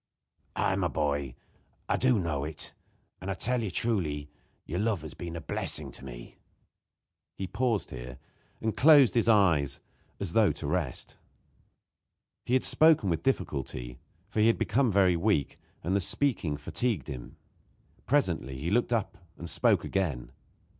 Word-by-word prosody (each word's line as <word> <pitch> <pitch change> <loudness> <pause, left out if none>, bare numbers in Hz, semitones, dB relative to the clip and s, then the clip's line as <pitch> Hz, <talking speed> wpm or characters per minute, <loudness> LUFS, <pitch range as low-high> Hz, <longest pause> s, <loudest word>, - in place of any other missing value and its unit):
"Aye, 95 - +1
my 95 -3 +1
boy, 75 -5 -1 0.5
I - - +2
do 130 -2 +3
know 80 -6 -1
it; 75 +1 -4 0.5
and 95 - -5
I 95 - -1
tell 125 +1 +1
you 110 - -2
truly, 75 -11 -1 0.3
your 90 +4 -3
love 105 -6 0
has 80 - -7
been 85 -1 -7
a 85 - -5
blessing - - -3
to - - -9
me." - - -10 1.0
He 95 - -3
paused 115 +2 -1
here, 65 0 -8 0.4
and 110 -1 -2
closed 145 -3 +7
his 115 -1 +2
eyes 85 - +3 0.4
as 95 -4 -2
though 110 -6 +5
to 75 +1 -7
rest. 75 -3 -3 1.3
He 125 - 0
had 130 - +3
spoken 155 - +4
with 80 - -1
difficulty, 65 - -2 0.3
for 105 +1 -3
he 110 - +5
had 115 - +3
become 125 0 +2
very 95 -2 +4
weak, 85 -5 0 0.3
and 90 +4 0
the 100 - +2
speaking 90 - 0
fatigued 110 +10 -2
him. 65 -5 -8 0.7
Presently 65 +1 +1
he 80 +7 -3
looked 120 +3 +2
up 110 -6 -1 0.2
and 85 - -7
spoke - - +2
again. 80 -11 -2
90 Hz, 155 wpm, -29 LUFS, 75-110 Hz, 1.3 s, closed